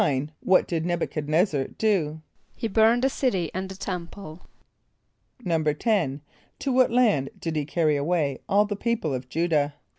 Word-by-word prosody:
= -, -, +5 dB, 0.4 s
What 185 Hz, -, +3 dB
did 165 Hz, -2 st, -1 dB
N[)e]b 175 Hz, -1 st, 0 dB
u -, -, -1 dB
chad 150 Hz, -2 st, -5 dB
n[)e]z´zar 155 Hz, -3 st, 0 dB
do? 160 Hz, -8 st, 0 dB, 0.3 s
=He 225 Hz, -, -3 dB
burned 225 Hz, +3 st, +3 dB
the -, -, +5 dB
city 240 Hz, -, -1 dB
and 190 Hz, +1 st, -4 dB
the 190 Hz, -, -7 dB
temple.= 180 Hz, -2 st, -7 dB, 1.0 s
=10.= 160 Hz, -, 0 dB, 0.4 s
To 275 Hz, -, -2 dB
what 255 Hz, 0 st, +4 dB
land 215 Hz, -, +2 dB
did 165 Hz, -1 st, -3 dB
he 150 Hz, -2 st, -1 dB
carry 155 Hz, -1 st, +1 dB
away 145 Hz, -2 st, 0 dB
all 205 Hz, +1 st, +4 dB
the 205 Hz, 0 st, -3 dB
people 215 Hz, -, -1 dB
of 125 Hz, 0 st, -5 dB
J[=u]´dah? 155 Hz, -3 st, +1 dB
170 Hz, 170 wpm, -25 LUFS, 150-205 Hz, 1.0 s, =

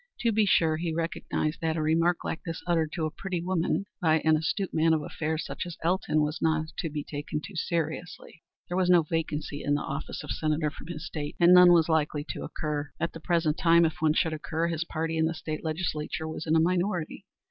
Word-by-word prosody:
To 235 Hz, -, +2 dB
be 215 Hz, -1 st, +2 dB
sure 160 Hz, -4 st, +3 dB
he 165 Hz, 0 st, -2 dB
recognized 165 Hz, -1 st, -2 dB
that 160 Hz, 0 st, 0 dB
a -, -, 0 dB
remark 165 Hz, +2 st, +2 dB
like 160 Hz, -, -3 dB
this 165 Hz, -1 st, -5 dB
uttered 165 Hz, -3 st, +1 dB
to 165 Hz, -3 st, -1 dB
a 155 Hz, -, -2 dB
pretty 185 Hz, +1 st, -4 dB
woman 180 Hz, +2 st, 0 dB, 0.2 s
by 160 Hz, -2 st, +4 dB
an 160 Hz, 0 st, +4 dB
astute 180 Hz, +5 st, -1 dB
man 160 Hz, 0 st, +3 dB
of 155 Hz, -, -2 dB
affairs 155 Hz, +1 st, -3 dB
such -, -, -4 dB
as 175 Hz, -, -8 dB
Elton 165 Hz, -3 st, +1 dB
was 150 Hz, +1 st, -3 dB
not 160 Hz, -1 st, +1 dB
to 165 Hz, -, -1 dB
be 150 Hz, -1 st, -4 dB
taken 145 Hz, +1 st, -4 dB
too 190 Hz, +5 st, -10 dB
seriously. 165 Hz, 0 st, -3 dB, 0.3 s
There 175 Hz, -, -3 dB
was 185 Hz, -1 st, +2 dB
no 175 Hz, -2 st, +6 dB
vacancy 155 Hz, -2 st, -3 dB
in 145 Hz, -, +2 dB
the 145 Hz, -, -2 dB
office 140 Hz, +3 st, -5 dB
of -, -, -6 dB
Senator 155 Hz, -1 st, 0 dB
from 150 Hz, -, -12 dB
his 160 Hz, -3 st, -6 dB
state, 145 Hz, -1 st, -5 dB
and 175 Hz, 0 st, +7 dB
none 180 Hz, -1 st, +9 dB
was 165 Hz, -2 st, +5 dB
likely 150 Hz, -2 st, 0 dB
to -, -, -4 dB
occur. 150 Hz, -2 st, -3 dB
At 170 Hz, +1 st, -1 dB
the 165 Hz, -, -8 dB
present 165 Hz, -2 st, +1 dB
time, 170 Hz, -1 st, +5 dB
if 160 Hz, -, -1 dB
one 155 Hz, -1 st, +4 dB
should 160 Hz, -1 st, +1 dB
occur, 160 Hz, +2 st, -2 dB
his 165 Hz, 0 st, -1 dB
party 165 Hz, 0 st, -2 dB
in 160 Hz, -, +3 dB
the 165 Hz, -, -3 dB
state 155 Hz, -1 st, -5 dB
legislature 160 Hz, -1 st, -2 dB
was 160 Hz, 0 st, -6 dB
in 160 Hz, -, +3 dB
a -, -, +5 dB
minority. 180 Hz, 0 st, 0 dB
160 Hz, 230 wpm, -28 LUFS, 155-170 Hz, 0.3 s, none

